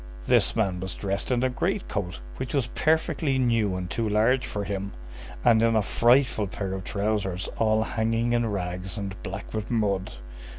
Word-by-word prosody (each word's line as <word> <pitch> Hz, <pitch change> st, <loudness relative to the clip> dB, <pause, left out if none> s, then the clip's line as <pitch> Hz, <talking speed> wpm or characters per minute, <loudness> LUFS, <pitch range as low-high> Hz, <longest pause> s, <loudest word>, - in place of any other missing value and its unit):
This -, -, +3 dB
man 95 Hz, -5 st, +1 dB
was 95 Hz, -1 st, -5 dB
dressed 100 Hz, 0 st, -2 dB
in 125 Hz, -1 st, +1 dB
a 130 Hz, -, +3 dB
great 190 Hz, +9 st, -1 dB
coat 90 Hz, -, -3 dB, 0.2 s
which 130 Hz, -, -4 dB
was 135 Hz, -4 st, +2 dB
perfectly 155 Hz, -3 st, +1 dB
new 115 Hz, -6 st, +2 dB
and 90 Hz, -1 st, -3 dB
too 110 Hz, +4 st, -1 dB
large 115 Hz, +5 st, +3 dB
for 105 Hz, -, -3 dB
him, 100 Hz, -1 st, -4 dB, 0.5 s
and 115 Hz, -2 st, +6 dB
in 115 Hz, 0 st, +3 dB
a 110 Hz, -, +3 dB
frightful 120 Hz, -2 st, +3 dB
pair 100 Hz, -3 st, -4 dB
of 95 Hz, -1 st, -4 dB
trousers 100 Hz, -3 st, -1 dB
all 110 Hz, -1 st, +3 dB
hanging 115 Hz, +1 st, 0 dB
in 120 Hz, -1 st, +2 dB
rags 90 Hz, -2 st, -4 dB
and 100 Hz, -1 st, -4 dB
black 95 Hz, +2 st, -6 dB
with 110 Hz, -1 st, -3 dB
mud. 100 Hz, -5 st, 0 dB
110 Hz, 180 wpm, -26 LUFS, 95-120 Hz, 0.5 s, and